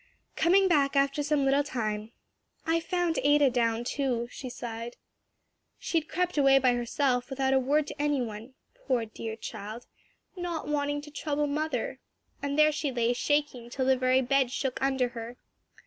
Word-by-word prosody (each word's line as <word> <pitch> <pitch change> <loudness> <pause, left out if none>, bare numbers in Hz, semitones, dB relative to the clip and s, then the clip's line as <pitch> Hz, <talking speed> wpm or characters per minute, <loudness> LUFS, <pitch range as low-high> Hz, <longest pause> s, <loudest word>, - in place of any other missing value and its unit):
Coming 380 +4 +4
back 285 -5 +2
after 275 +1 +2
some 290 -1 +1
little 275 +1 +3
time, 215 -5 -3 0.5
"I 325 +1 +2
found 345 -1 -1
Ada 290 -1 +4
down, 230 -1 +1
too," 245 -2 -1
she 255 - -7
sighed. 235 0 -6 0.8
"She 330 - 0
had 310 - -14
crept 360 -2 0
away 275 -1 +6
by 255 -2 +4
herself, 245 +2 0
without 265 0 0
a 265 - +5
word 285 +4 +2
to 290 - -6
any 295 -1 +1
one 230 +2 -6 0.2
poor, 260 - -1
dear 220 0 -6
child! 220 +1 -7 0.5
'not 350 -4 -4
wanting 290 0 -1
to 295 0 -12
trouble 295 0 -1
mother,' 285 -3 -2 0.4
and 280 0 -2
there 305 0 +6
she 300 -2 -2
lay 240 -1 +1
shaking 285 -2 -1
till 260 +1 -2
the 265 0 +4
very 255 +1 +2
bed 265 0 +2
shook 265 -1 -3
under 265 -2 +1
her." 235 0 -8
270 Hz, 170 wpm, -28 LUFS, 245-295 Hz, 0.8 s, away